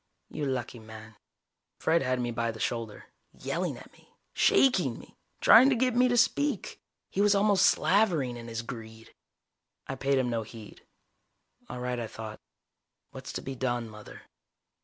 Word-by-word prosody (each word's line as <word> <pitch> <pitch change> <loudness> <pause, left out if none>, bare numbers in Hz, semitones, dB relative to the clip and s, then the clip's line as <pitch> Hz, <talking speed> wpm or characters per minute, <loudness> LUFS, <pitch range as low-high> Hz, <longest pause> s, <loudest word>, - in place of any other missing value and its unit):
You 145 - -3
lucky 125 -2 -3
man._ 110 0 -12 0.6
Fred 165 +1 +2
had 130 -1 0
me 120 -1 -2
by 115 0 -1
the 110 -1 -6
shoulder, 115 -3 -4 0.3
yelling - - -3
at - - -14
me, - - -23 0.2
shaking 180 - +3
me, - - -15 0.3
trying 250 +4 +8
to 270 - +2
get 250 0 +1
me 250 +1 +5
to 245 -1 +1
speak. 285 +4 0 0.3
He 200 - 0
was 205 0 +4
almost 200 -1 +4
slavering 175 - +2
in 120 -1 -9
his 115 0 -4
greed. 115 -2 -10 0.7
I - - -5
paid 135 +1 0
him 125 -2 0
no 115 -1 -1
heed. 110 -1 -12 0.9
All 125 - -6
right, 125 0 -3
I 115 - -4
thought. 110 -1 -8 0.7
_What's - - -8
to - - -5
be 135 - -5
done, 120 -2 -2
Mother? 105 -1 -12
125 Hz, 165 wpm, -28 LUFS, 115-190 Hz, 0.9 s, trying